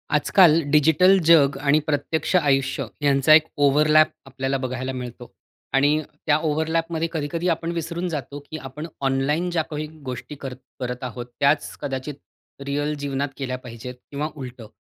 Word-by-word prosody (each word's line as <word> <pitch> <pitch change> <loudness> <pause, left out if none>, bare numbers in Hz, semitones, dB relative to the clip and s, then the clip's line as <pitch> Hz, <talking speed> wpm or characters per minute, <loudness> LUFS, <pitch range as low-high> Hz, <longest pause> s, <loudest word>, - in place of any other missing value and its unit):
आजकाल 165 +1 +5
डिजिटल 160 +6 +5
जग 145 -4 +6
आणि 145 +1 +4
प्रत्यक्ष 155 +4 -1
आयुष्य 135 -4 +2 0.2
ह्यांचा 140 +1 +4
एक 155 0 +7 0.2
ओव्हरलॅप 150 +2 +5 0.2
आपल्याला 135 0 -2
बघायला 130 0 -3
मिळतो. 125 -1 -8 0.4
आणि 145 +3 +3 0.2
त्या 150 -2 +4
ओव्हरलॅपमध्ये 160 +1 -1
कधी-कधी 165 +2 -2
आपण 165 0 -1
विसरून 170 +1 -3
जातो, 145 -3 -5
की 145 +2 -9
आपण 150 +2 -7
ऑनलाईन 140 +6 0
ज्या 165 -2 +1
काही 150 0 -3 0.2
गोष्टी 130 +3 -6
करत 135 -2 -7 0.2
करत 125 0 -4
आहोत. 125 -1 -5
त्याच 145 +2 +2
कदाचित 135 +1 -4 0.5
रिअल 145 +2 -1
जीवनात 140 0 -2
केल्या 130 -2 -3
पाहिजेत 125 +1 -8 0.2
किंवा 145 +2 -2
उलटं. 125 -5 -8
145 Hz, 145 wpm, -23 LUFS, 135-155 Hz, 0.5 s, एक